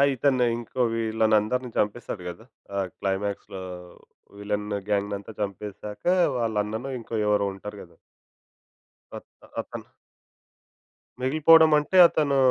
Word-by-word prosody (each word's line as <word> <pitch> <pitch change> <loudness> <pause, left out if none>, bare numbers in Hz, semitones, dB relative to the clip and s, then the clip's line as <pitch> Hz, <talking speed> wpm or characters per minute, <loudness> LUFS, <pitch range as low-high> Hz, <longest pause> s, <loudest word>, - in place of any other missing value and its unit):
ఇతను 130 -1 +2
ఇంకో 120 +2 -4
వీళ్ళనందరిని 110 +2 +1
చంపేస్తాడు 105 -2 -2
కదా! 90 +6 -10 0.3
ఆహ్, 95 -2 -1
క్లైమాక్స్‌లో 95 -1 -3 0.8
విలన్ 105 0 -3 0.2
గ్యాంగ్‌నంతా 100 0 -2
చంపేసాక 105 +1 -6 0.3
వాళ్ళ 115 -2 -1
అన్ననో 110 +6 -5
ఇంకో 115 0 -7
ఎవరో 105 -1 +2
ఉంటారు 105 +2 -9
కదా! 85 -1 -18 1.2
అ - - -6 0.4
అతను - - -9 1.3
మిగిలిపోవడం 155 +4 +6
అంటే 150 +6 -1
అతను 145 -4 +1
105 Hz, 100 wpm, -25 LUFS, 100-125 Hz, 1.3 s, మిగిలిపోవడం